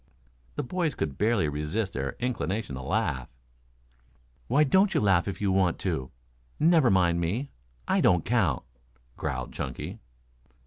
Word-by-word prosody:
The - - -2
boys 165 +3 -1
could 75 -3 -3
barely 105 -6 +2
resist 75 +8 -2
their 70 0 -3
inclination 110 - -2
to 65 - -5
laugh. 65 -1 -1 1.2
"Why 140 +5 +4
don't 190 +7 +3
you - - +4
laugh 95 -4 +3
if 100 - -4
you 100 -2 +1
want 95 -2 +2
to? 80 -9 -2 0.5
Never 160 -5 +5
mind 85 -3 +3
me. 110 +12 -2 0.4
I - - +2
don't 85 -3 +3
count," 95 - +1 0.5
growled 65 -2 -4
Chunky. 65 -3 -5
95 Hz, 140 wpm, -28 LUFS, 75-120 Hz, 1.2 s, Never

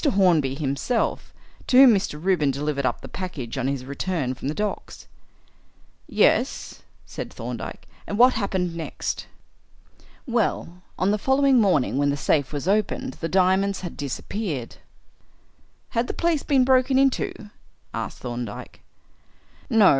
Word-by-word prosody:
Hornby 180 - +3
himself, 145 - -1 0.4
to 255 - +4
whom 260 -3 +9
Mr. 190 -7 -1
Reuben 170 -4 +2
delivered 140 0 -1
up - - -2
the - - -9
package 150 -11 -6
on 125 - 0
his 135 -2 -2
return 140 -1 -2
from 130 - -6
the 150 - -2
docks." 210 0 -4 1.0
"Yes," - - +1 0.2
said - - -7
Thorndyke, - - -7 0.2
"and 205 - -3
what 250 +2 +7
happened 190 -5 -1
next?" 165 -1 -4 1.0
"Well, 220 - -1 0.2
on 190 +2 +2
the 210 - 0
following 265 +1 +4
morning, 155 - +2
when 145 0 +2
the 140 - 0
safe 140 0 +1
was 145 +2 -4
opened, 215 +6 0
the 165 - -2
diamonds 190 +1 +2
had 175 -3 -6
disappeared." 145 - -4 1.1
"Had 230 +1 0
the - - -4
place 335 -4 +1
been 270 -4 +3
broken 260 0 +4
into?" 260 -5 0 0.4
asked - - -5
Thorndyke. 120 -3 -6 0.9
"No. 215 -4 +6
185 Hz, 140 wpm, -24 LUFS, 145-230 Hz, 1.1 s, whom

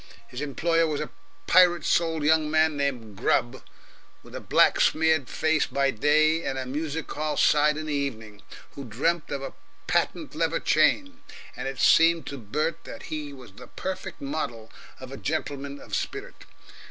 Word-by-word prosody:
His 125 - -8
employer 165 +3 +1
was 150 -2 -2
a 150 - -5 0.3
pirate 180 -1 +5
souled 165 -2 +1
young 155 0 +3
man 155 0 +2
named 125 -7 -3
Grubb, 120 +4 0 0.6
with - - -15
a - - -5
black - - +3
smeared 160 -3 +2
face 155 -1 +1
by 135 +1 +1
day, 155 +7 +2
and 135 - -3
a 130 - -3
music 150 +3 -4
hall 155 0 -2
side 150 0 +4
in 155 - -5
the 150 - -3
evening, 110 -7 -4 0.3
who 140 - -9
dreamt 145 +8 -1
of 140 -1 -4
a - - -6 0.3
patent - - -1
lever - - 0
chain; 280 -1 +1 0.3
and 125 - -5
it 135 -1 -5
seemed 165 -2 +5
to 140 - -6
Bert 150 +9 -3
that - - -9
he 150 -2 -5
was 130 -6 -13
the 125 +4 -13
perfect 190 0 -6
model 135 -6 -4 0.3
of - - -10
a - - -7
gentleman 140 0 -4
of - - -6
spirit. - - -5
150 Hz, 170 wpm, -26 LUFS, 135-160 Hz, 0.6 s, pirate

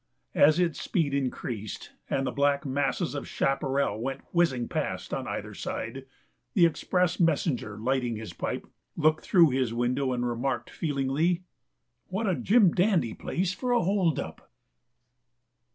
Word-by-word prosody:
As 155 +3 +5
its 170 -3 0
speed 150 -5 0
increased, 120 -6 -3 0.2
and 135 - 0
the - - -1
black 140 0 +1
masses 140 +5 0
of 145 - -5
chaparral 135 -5 0
went 135 +2 -3
whizzing 160 -9 +2
past - - -3
on - - -3
either - - -4
side, - - -5 0.5
the 175 - +7
express 180 +2 +1
messenger, 150 - +1
lighting 125 +1 0
his 110 0 -7
pipe, - - -3 0.3
looked 155 -1 +3
through 170 -6 +5
his 125 -3 0
window 125 +3 0
and 125 -1 -1
remarked, 120 0 -2
feelingly: 155 +4 0 0.6
"What 195 +5 -2
a 190 - +2
jim 200 0 +4
dandy 180 - +2
place 185 +1 -2
for 245 +7 -2
a 240 - +3
hold 180 -5 +2
up!" - - -7
140 Hz, 145 wpm, -28 LUFS, 130-175 Hz, 0.6 s, the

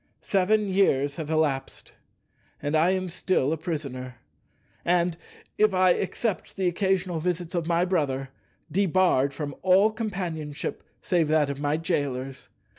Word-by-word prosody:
Seven 205 +2 +2
years 145 -8 +2
have 155 -2 -5
elapsed 150 -4 -1 0.7
and 145 +2 -1
I 160 +3 +4
am 185 0 0
still 165 -4 0
a - - -2
prisoner, 140 -7 -5 0.7
and—if 180 +4 0
I 185 0 +5
except 205 +1 -2
the 190 -2 0
occasional 185 -1 0
visits 175 0 -2
of 170 -2 -1
my 170 +1 +2
brother—debarred 155 +1 0
from 145 0 -5
all 190 +4 +5
companionship 180 -9 -4 0.2
save 170 -4 +2
that 150 -2 +2
of 140 - -6
my 145 +1 0
jailers. 140 -5 -3
165 Hz, 125 wpm, -26 LUFS, 145-185 Hz, 0.7 s, I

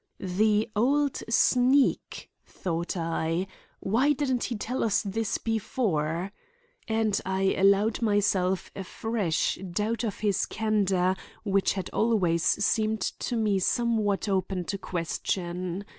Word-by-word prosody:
"The 210 +3 +1
old 280 +5 +1
sneak!" 255 +4 +2
thought 170 0 -4
I. 165 +1 -1 0.4
"Why 255 +9 +2
didn't 260 -4 -1
he 245 - -3
tell 240 +5 -2
us 220 -3 +1
this 210 +1 -2
before?" 190 -6 -1 0.6
And 220 -2 +1
I 190 0 +1
allowed 200 +4 +3
myself 195 -4 +1
a 195 - -5
fresh 205 -4 -1
doubt 215 +6 -1
of 215 -4 -4
his 205 -2 +1
candor 195 -4 +1 0.3
which 195 -2 +1
had 190 -2 -5
always 190 -7 +2
seemed 215 +4 +1
to 245 - -3
me 210 -4 +1
somewhat 215 -1 +1
open 190 -2 -1
to 200 +2 -4
question. 180 +1 -3
205 Hz, 120 wpm, -27 LUFS, 185-225 Hz, 0.6 s, allowed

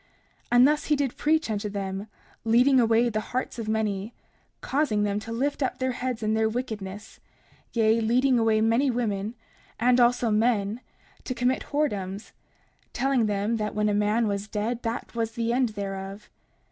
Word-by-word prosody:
30:18 - - -35 0.5
And 245 +2 +7
thus 300 0 +1
he 300 - +2
did 275 -3 -1
preach 315 +1 +1
unto 210 0 -2
them, 195 0 -4 0.4
leading 250 +4 +4
away 230 0 +4
the 215 -2 -1
hearts 245 +3 -4
of 220 -1 -4
many, 215 0 -1 0.4
causing 260 -7 0
them 205 0 0
to 225 - -8
lift 280 +6 -1
up 265 - -1
their 260 0 0
heads 245 -2 -3
in 215 0 +1
their 220 0 +2
wickedness, 215 -3 -6 0.5
yea, 225 0 +3
leading 250 +3 +3
away 220 -1 +3
many 230 +5 +3
women, 220 -3 -2 0.4
and 245 +2 +4
also 240 -1 +3
men, 215 0 +1 0.4
to 255 - -4
commit 250 +2 0
whoredoms—telling 240 +1 -3
them 205 +2 0
that 210 -1 -3
when 210 0 +1
a - - +1
man 210 +2 +2
was 200 0 -2
dead, 225 +3 -2
that 230 0 -4
was 225 -1 -2
the 230 0 -1
end 250 -1 +2
thereof. 195 +1 -6
225 Hz, 170 wpm, -26 LUFS, 210-245 Hz, 0.5 s, And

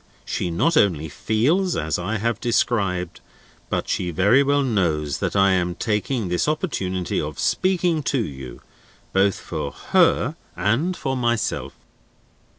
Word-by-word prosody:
She 90 - -2
not 155 - +1
only 80 -6 +2
feels 155 - +1
as 80 +2 -1
I 100 +6 -2
have 115 0 -1
described, 100 -7 0 0.5
but - - -1
she 90 - -1
very 100 - +4
well 140 0 +2
knows 80 - 0
that - - -2
I 95 -1 +5
am 90 -1 0
taking 110 +2 -1
this 90 +7 0
opportunity 95 - -1
of - - -5
speaking 180 -4 +1
to 140 - +1
you, 65 - -6 0.5
both 95 0 +3
for - - -4
her - - +2 0.2
and 115 - 0
for 135 0 -2
myself." 120 -4 -1
105 Hz, 140 wpm, -22 LUFS, 90-135 Hz, 0.5 s, I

